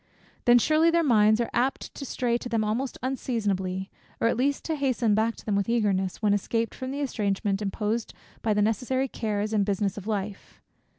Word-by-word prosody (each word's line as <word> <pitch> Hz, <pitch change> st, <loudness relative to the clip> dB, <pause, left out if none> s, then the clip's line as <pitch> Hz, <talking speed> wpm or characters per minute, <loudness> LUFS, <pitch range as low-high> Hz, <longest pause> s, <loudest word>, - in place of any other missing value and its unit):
Then 240 Hz, 0 st, +7 dB
surely 310 Hz, +6 st, +4 dB
their 335 Hz, 0 st, +3 dB
minds 215 Hz, -5 st, +4 dB
are 235 Hz, -, 0 dB
apt 260 Hz, +3 st, -1 dB
to 280 Hz, -, -7 dB
stray 240 Hz, -1 st, 0 dB
to 245 Hz, -, -6 dB
them 225 Hz, -2 st, +1 dB
almost 235 Hz, +5 st, -2 dB
unseasonably; 200 Hz, -8 st, -2 dB, 0.3 s
or -, -, +3 dB
at -, -, +1 dB
least 275 Hz, +4 st, 0 dB
to 320 Hz, -, -1 dB
hasten 255 Hz, -6 st, +1 dB
back 220 Hz, +2 st, +1 dB
to -, -, -14 dB
them 210 Hz, -, 0 dB
with 200 Hz, +2 st, 0 dB
eagerness, 200 Hz, -4 st, 0 dB
when 205 Hz, -1 st, +4 dB
escaped 225 Hz, +3 st, -1 dB
from 260 Hz, -, -6 dB
the 280 Hz, +2 st, -3 dB
estrangment 205 Hz, -5 st, -1 dB
imposed 210 Hz, +3 st, -2 dB, 0.3 s
by 215 Hz, -2 st, +1 dB
the 210 Hz, -, +3 dB
necessary 250 Hz, +5 st, 0 dB
cares 215 Hz, -3 st, -2 dB
and 210 Hz, -2 st, +3 dB
business 200 Hz, 0 st, -1 dB
of 200 Hz, -, -11 dB
life. 205 Hz, -2 st, -4 dB
225 Hz, 195 wpm, -27 LUFS, 205-250 Hz, 0.3 s, Then